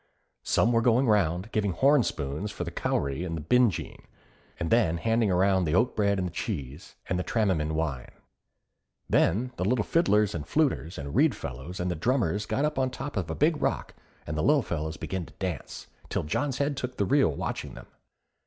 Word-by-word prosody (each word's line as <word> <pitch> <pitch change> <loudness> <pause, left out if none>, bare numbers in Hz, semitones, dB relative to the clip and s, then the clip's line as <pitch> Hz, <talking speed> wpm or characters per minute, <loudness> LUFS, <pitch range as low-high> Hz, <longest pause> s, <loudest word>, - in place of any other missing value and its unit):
Some 115 - +2
were 115 -1 +3
going 120 +3 +3
round, 100 -2 +1
giving 100 -3 0
horn 140 +6 +4
spoons 75 - -3
for 90 - -5
the 85 - -5
cowree 70 0 -1
and 80 -4 -5
binjean, 125 -5 +2 0.6
and 85 - -2
then 90 -8 +3
handing 115 +3 +1
round 95 -1 +3
the 75 - +1
oatbread 105 -3 +2
and 90 -2 -2
cheese, 75 - -5
and 90 - -1
the - - -1
tramman 90 -10 0
wine. 75 -6 -2 1.0
Then 120 +9 +2
the - - -1
little 105 +2 +1
fiddlers 105 - +2
and 80 - -3
fluters 130 - 0
and 70 0 -6
reed - - +3
fellows 65 +9 -7
and 90 0 -1
the - - -2
drummers 105 - 0
got 125 +6 0
upon 135 -3 0
the 125 - -10
top 140 +2 -5
of 90 -6 -2
a 80 - -2
big 150 +1 +2
rock, - - -1 0.3
and 75 - -4
the 75 - 0
Lil 145 - +4
Fellas 80 -3 -3
began 95 -3 -4
to - - -16
dance, 90 -8 -5 0.2
till - - -1
John's 130 - -1
head 140 0 0
took 130 -1 -5
the 100 - +1
reel 135 - +4
watching - - -4
them. - - -10
95 Hz, 190 wpm, -27 LUFS, 80-120 Hz, 1.0 s, horn